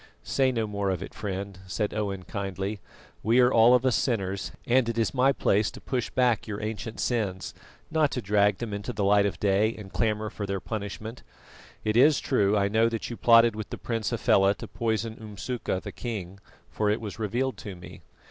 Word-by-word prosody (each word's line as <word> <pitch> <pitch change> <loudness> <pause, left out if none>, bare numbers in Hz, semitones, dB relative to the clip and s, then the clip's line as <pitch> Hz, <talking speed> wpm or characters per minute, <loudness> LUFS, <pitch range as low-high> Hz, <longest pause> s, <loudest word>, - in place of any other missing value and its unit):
"Say 135 -1 +2
no 115 -3 -1
more 100 -2 -2
of 95 -3 -2
it, - - -9
friend," 100 -2 -5
said 105 +2 -2
Owen 100 -3 -3
kindly, 100 +1 -4 0.4
"We 115 +4 +3
are 125 0 +5
all 115 +2 +7
of 125 +1 +1
us 130 - +3
sinners, 100 -6 -1
and 120 -1 +3
it 115 - -3
is 115 - +1
my 135 +1 +4
place 105 -4 +2
to - - -11
push 125 -3 -2
back 125 -4 +1
your 105 -1 -4
ancient 110 +1 -5
sins, 105 -6 -1 0.4
not 155 -2 +3
to - - -1
drag 105 -2 +2
them 115 -3 -5
into 100 0 -4
the 100 - -2
light 100 +1 +4
of 90 -6 -5
day 105 +3 +2
and 100 -3 -11
clamour 110 -1 0
for 100 - -5
their 100 0 -2
punishment. 110 +3 -6 0.6
It 110 0 0
is 145 +5 +6
true 105 -5 +2
I 100 0 +2
know 110 +3 +3
that 115 +1 -4
you - - -4
plotted 115 -1 +5
with 110 -1 -6
the - - -5
Prince 115 -3 -2
Hafela 100 -4 +3
to - - -8
poison 115 -1 -2
Umsuka 110 -1 -4
the - - -7
King, 100 -6 -6 0.3
for 105 -1 0
it 105 - +1
was 110 0 -7
revealed 120 +3 -1
to 95 0 -7
me. 90 - -12
110 Hz, 205 wpm, -27 LUFS, 100-115 Hz, 0.6 s, all